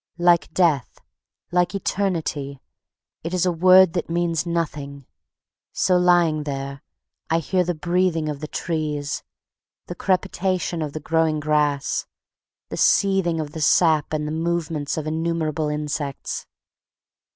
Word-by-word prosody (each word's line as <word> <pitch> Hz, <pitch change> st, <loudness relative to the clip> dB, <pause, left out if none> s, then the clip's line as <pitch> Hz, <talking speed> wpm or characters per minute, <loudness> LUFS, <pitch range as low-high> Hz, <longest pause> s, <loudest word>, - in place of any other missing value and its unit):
Like 175 Hz, -1 st, +3 dB
Death, 160 Hz, -9 st, +2 dB, 0.5 s
like 180 Hz, +2 st, +1 dB
Eternity, 165 Hz, -8 st, -2 dB, 0.6 s
it 170 Hz, +3 st, -3 dB
is 180 Hz, -, +1 dB
a 180 Hz, -, +2 dB
word 185 Hz, +1 st, +6 dB
that 175 Hz, -3 st, -2 dB
means 170 Hz, -1 st, 0 dB
nothing. 145 Hz, -5 st, -3 dB, 0.7 s
So 185 Hz, -, +2 dB
lying 175 Hz, -3 st, +3 dB
there 140 Hz, -1 st, -5 dB, 0.5 s
I 165 Hz, -, +3 dB
hear 180 Hz, +3 st, +1 dB
the 175 Hz, 0 st, -2 dB
breathing 170 Hz, 0 st, 0 dB
of 150 Hz, -2 st, -4 dB
the 155 Hz, -, -5 dB
trees, 150 Hz, -4 st, -3 dB, 0.6 s
the -, -, -6 dB
crepitation 185 Hz, -2 st, -1 dB
of 150 Hz, -2 st, -4 dB
the 155 Hz, -, -4 dB
growing 160 Hz, -1 st, +1 dB
grass, 150 Hz, -1 st, 0 dB, 0.6 s
the -, -, -5 dB
seething 190 Hz, -5 st, +3 dB
of 150 Hz, -2 st, -4 dB
the 160 Hz, -, -6 dB
sap 155 Hz, 0 st, +3 dB
and 150 Hz, -1 st, -2 dB
the -, -, -3 dB
movements 160 Hz, -2 st, -2 dB
of 155 Hz, -, -3 dB
innumerable 160 Hz, -1 st, -1 dB
insects. 150 Hz, -2 st, -4 dB
160 Hz, 130 wpm, -23 LUFS, 150-175 Hz, 0.7 s, word